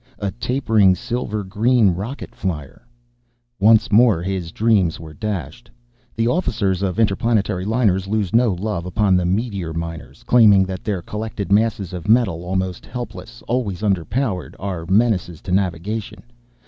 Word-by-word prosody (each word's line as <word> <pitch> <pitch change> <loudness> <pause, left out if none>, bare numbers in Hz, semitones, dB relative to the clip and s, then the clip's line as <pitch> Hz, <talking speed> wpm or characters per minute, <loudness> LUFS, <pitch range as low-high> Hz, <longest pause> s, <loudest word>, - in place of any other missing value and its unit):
A 100 -1 -3
tapering 115 -6 +2
silver 110 0 -3
green 110 +2 +3
rocket 105 +11 -6
flier. 85 - -5 0.7
Once 110 +2 +4
more 110 -5 +4
his 95 -3 -3
dreams 100 -7 +2
were 80 -2 -10
dashed. 105 - -5 0.5
The 115 0 +1
officers 110 - 0
of 95 +1 -1
interplanetary 105 -3 +1
liners 105 -4 +1
lose 105 -3 -1
no 120 -1 +4
love 90 -1 -3
upon 100 0 +2
the 90 -1 +1
meteor 95 -4 -2
miners, 80 -5 -7
claiming 105 -5 +6
that 95 -1 -6
their 100 -5 -2
collected 105 -1 -5
masses 105 -3 +1
of 90 +1 -6
metal, 105 -8 +3
almost 95 0 -2
helpless, 120 -1 -8
always 110 -6 -2
underpowered, 100 +1 -1
are 90 -4 -5
menaces 95 -5 +1
to 95 - -7
navigation. 95 +3 -2
100 Hz, 140 wpm, -20 LUFS, 90-115 Hz, 0.7 s, claiming